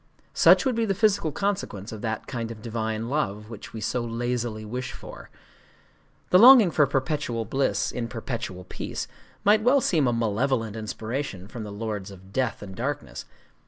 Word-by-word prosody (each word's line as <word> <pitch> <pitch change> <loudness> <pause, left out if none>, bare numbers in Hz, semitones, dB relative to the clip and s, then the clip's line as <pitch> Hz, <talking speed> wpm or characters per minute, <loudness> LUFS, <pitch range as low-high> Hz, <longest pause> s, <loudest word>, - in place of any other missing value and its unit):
Such - - +6
would 260 - +2
be 230 0 +1
the 195 -2 0
physical 200 -5 +2
consequence 190 - -2
of 110 -2 -7
that 110 -2 -3
kind 115 -3 -4
of 110 -2 -9
divine 110 -1 -2
love 105 -6 -2
which 110 - -9
we 110 - -7
so 120 +3 -1
lazily 120 -1 -2
wish 125 +4 -4
for. - - -11 1.0
The 180 - +7
longing 235 -5 +9
for 150 -2 +4
perpetual 135 -4 -1
bliss 135 +6 0
in 120 -1 -3
perpetual 115 -6 -5
peace 90 - -5 0.4
might 210 +1 +5
well 250 +5 +5
seem 160 - +2
a - - +3
malevolent 115 0 0
inspiration 110 -2 -4
from 115 +2 -8
the 105 - -7
Lords 105 -2 -4
of 95 0 -14
Death 125 -5 -1
and 95 -2 -8
Darkness. 115 - -4
115 Hz, 170 wpm, -26 LUFS, 110-145 Hz, 1.0 s, longing